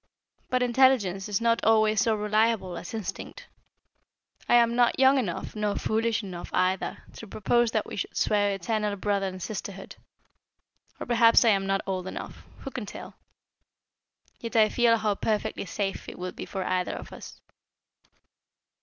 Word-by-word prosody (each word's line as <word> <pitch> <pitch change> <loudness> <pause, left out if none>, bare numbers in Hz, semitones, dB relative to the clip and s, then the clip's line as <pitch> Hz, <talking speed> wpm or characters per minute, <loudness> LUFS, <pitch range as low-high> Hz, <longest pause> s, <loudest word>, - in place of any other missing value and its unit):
But 255 0 +1
intelligence 235 -6 +2
is 205 - 0
not 230 0 +1
always 215 -1 +4
so 220 +1 +2
reliable 215 -2 0
as 175 - -7
instinct. 225 - -6 1.0
I - - +6
am 235 -1 +4
not 240 -1 +3
young 265 +1 +5
enough 200 -5 -4
nor 210 -1 -1
foolish 225 0 0
enough 180 -3 -7
either, 185 +1 0
to 225 - -10
propose 235 +4 +1
that 220 -2 -1
we - - -8
should - - -5
swear 205 -1 +2
eternal 205 +2 -2
brother 200 0 -1
and 185 0 -6
sisterhood 195 0 -7 1.0
or - - -5
perhaps 235 0 +5
I - - +6
am 195 -2 +2
not 195 0 +1
old 185 -1 -3
enough, - - -8 0.2
who 270 - -7
can 240 -5 -6
tell? - - -9 1.3
Yet 230 +1 -7
I 215 -1 +5
feel 235 -1 +3
how 215 -1 0
perfectly 210 0 -2
safe 195 +2 -4
it - - -10
would 180 0 -6
be - - -7
for 190 -1 -4
either 185 0 -1
of - - -9
us." - - -11
215 Hz, 165 wpm, -27 LUFS, 195-230 Hz, 1.3 s, I